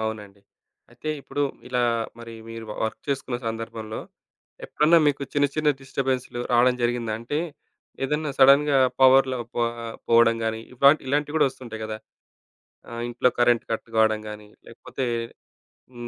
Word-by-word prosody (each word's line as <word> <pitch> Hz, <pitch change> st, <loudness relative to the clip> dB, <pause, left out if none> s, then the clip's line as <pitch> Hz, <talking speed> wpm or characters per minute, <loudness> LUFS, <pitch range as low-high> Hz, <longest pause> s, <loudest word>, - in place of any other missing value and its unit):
అవునండి. 105 Hz, -2 st, -5 dB, 0.5 s
అయితే 155 Hz, -, -8 dB
ఇప్పుడు 145 Hz, +1 st, -3 dB, 0.3 s
ఇలా 125 Hz, -, 0 dB, 0.4 s
మరి 115 Hz, -1 st, -9 dB
మీరు 115 Hz, 0 st, -7 dB, 0.2 s
వర్క్ 110 Hz, -, -4 dB
చేసుకున్న 135 Hz, -3 st, -2 dB
సందర్భంలో 115 Hz, -1 st, -5 dB, 0.7 s
ఎప్పుడన్నా 160 Hz, +3 st, +4 dB
మీకు 140 Hz, -1 st, 0 dB
చిన్న, 145 Hz, 0 st, +3 dB
చిన్న 155 Hz, -1 st, +2 dB
డిస్టర్బెన్స్‌లు 130 Hz, -2 st, -2 dB
రావడం 125 Hz, +1 st, +4 dB
జరిగిందా? 120 Hz, -2 st, 0 dB
అంటే, 120 Hz, +6 st, -3 dB, 0.7 s
ఏదన్నా 150 Hz, +2 st, -1 dB
సడెన్‌గా 140 Hz, +1 st, +6 dB, 0.2 s
పవర్‌లో 130 Hz, 0 st, +6 dB, 0.2 s
పో 120 Hz, -, 0 dB, 0.5 s
పోవడం 115 Hz, 0 st, +5 dB
గాని 110 Hz, 0 st, -1 dB
ఇవా 140 Hz, +3 st, +6 dB, 0.2 s
ఇలాంటివి 145 Hz, +3 st, -1 dB
కూడా 145 Hz, -, +4 dB
వస్తుంటాయి 120 Hz, -4 st, -9 dB
గదా! 110 Hz, 0 st, -4 dB, 0.9 s
ఆ! -, -, -11 dB, 0.2 s
ఇంట్లో 125 Hz, +1 st, +2 dB
కరెంట్ 120 Hz, -1 st, +4 dB
కట్ 115 Hz, -, -3 dB
కావడం 110 Hz, -1 st, +3 dB
గాని, 105 Hz, 0 st, -9 dB, 0.2 s
లేకపోతే 125 Hz, +3 st, -6 dB, 0.9 s
హ్మ్. 120 Hz, -1 st, -8 dB
120 Hz, 135 wpm, -24 LUFS, 115-135 Hz, 0.9 s, సడెన్‌గా